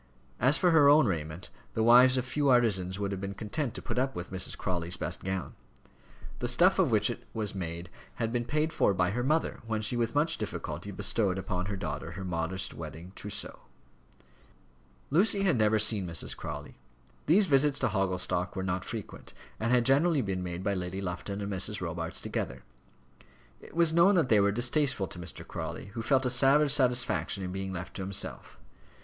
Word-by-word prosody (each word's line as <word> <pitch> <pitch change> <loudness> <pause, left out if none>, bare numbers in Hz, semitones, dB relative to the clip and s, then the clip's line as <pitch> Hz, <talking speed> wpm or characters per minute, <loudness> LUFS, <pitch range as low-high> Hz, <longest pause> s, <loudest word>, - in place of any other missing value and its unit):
As 135 +6 +4
for 180 -2 +3
her 150 -3 +6
own 150 -1 +6
raiment, 80 -3 -4 0.2
the 110 - +1
wives 125 +3 +7
of 130 - -1
few 145 +2 0
artisans 100 -7 +2
would 100 -1 -2
have 95 -1 -4
been 100 0 -5
content 120 +5 -3
to - - -6
put 120 0 -2
up 135 +1 -1
with 85 +2 -6
Mrs. 95 0 -3
Crawley's 85 -2 -2
best - - -4
gown. 95 -1 -3 0.9
The - - -1
stuff - - +4
of - - +4
which - - +3
it - - -9
was 110 -2 -2
made 85 -2 -5 0.3
had 115 -1 -2
been 120 -1 -1
paid 155 +4 0
for 100 - +2
by 90 +1 +1
her 120 +4 -2
mother 155 +6 0
when 110 -1 -2
she 120 - +2
with 120 +1 -1
much 160 +3 +1
difficulty 105 - -5
bestowed 100 -5 0
upon 90 0 -3
her 100 - -3
daughter 85 -3 -5
her 95 +3 -6
modest 90 +1 -3
wedding 85 +4 -8
trousseau. 105 - -5 1.5
Lucy 195 +5 +3
had 185 -6 +3
never 110 -1 +3
seen 105 -3 +2
Mrs. 85 -2 -4
Crawley. - - -7 0.5
These 190 +7 +5
visits 140 -2 +3
to 130 - +1
Hogglestock 90 -2 -1
were 95 - -3
not 90 0 -2
frequent, 110 -2 -8 0.3
and 115 - -1
had 125 -1 +3
generally 145 +3 +4
been 95 -2 -2
made 90 0 -5
by 100 0 0
Lady 90 0 -4
Lufton 100 +2 -4
and 100 0 -4
Mrs. 95 -1 0
Robarts - - -4
together. 60 0 -4 1.0
It - - -15
was 170 -1 +3
known 180 +4 +5
that 165 -8 +2
they 110 - +5
were 100 0 +3
distasteful 120 0 +1
to 90 - -7
Mr. 85 - -8
Crawley, 100 - -6
who 115 - -4
felt 130 +2 +2
a 125 - +2
savage 140 +3 +4
satisfaction 125 -6 +1
in 90 - -4
being 95 0 -4
left 90 0 -6
to - - -5
himself. 95 0 -2
105 Hz, 195 wpm, -29 LUFS, 95-130 Hz, 1.5 s, wives